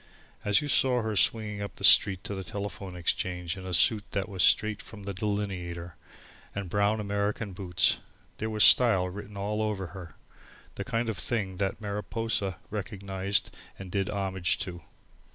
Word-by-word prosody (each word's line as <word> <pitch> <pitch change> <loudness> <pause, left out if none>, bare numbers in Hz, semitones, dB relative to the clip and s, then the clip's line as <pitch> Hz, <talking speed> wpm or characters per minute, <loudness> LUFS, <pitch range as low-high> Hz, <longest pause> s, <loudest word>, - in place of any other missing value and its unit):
As 105 +4 +4
you - - -3
saw 130 -4 +3
her 110 -1 -2
swinging 105 0 +1
up 100 -3 -5
the - - -10
street 95 -3 +6
to - - -4
the 95 -1 -4
Telephone 100 0 -6
Exchange 90 0 -1
in 95 -1 -8
a - - -4
suit 105 +4 +4
that 100 0 -1
was 95 -3 -2
straight 110 +2 +4
out - - -14
of 100 - -10
the 100 - -3
Delineator 95 -4 -3 0.6
and 100 -4 -4
brown 100 +1 +2
American 100 0 -2
boots, 90 -2 +2 0.4
there 110 - -2
was 110 -1 +2
style 105 -7 +6
written 100 +2 -8
all 105 +2 -1
over 105 -4 -2
her, 85 -6 -9 0.6
the - - -4
kind 120 -1 -1
of 110 -5 -2
thing 100 -6 -2
that 95 +1 -1
Mariposa 105 -1 -2
recognised 100 -2 -2 0.3
and 95 -2 -9
did 100 -2 0
homage 95 -2 0
to. 90 -3 -5
100 Hz, 170 wpm, -29 LUFS, 95-105 Hz, 0.6 s, street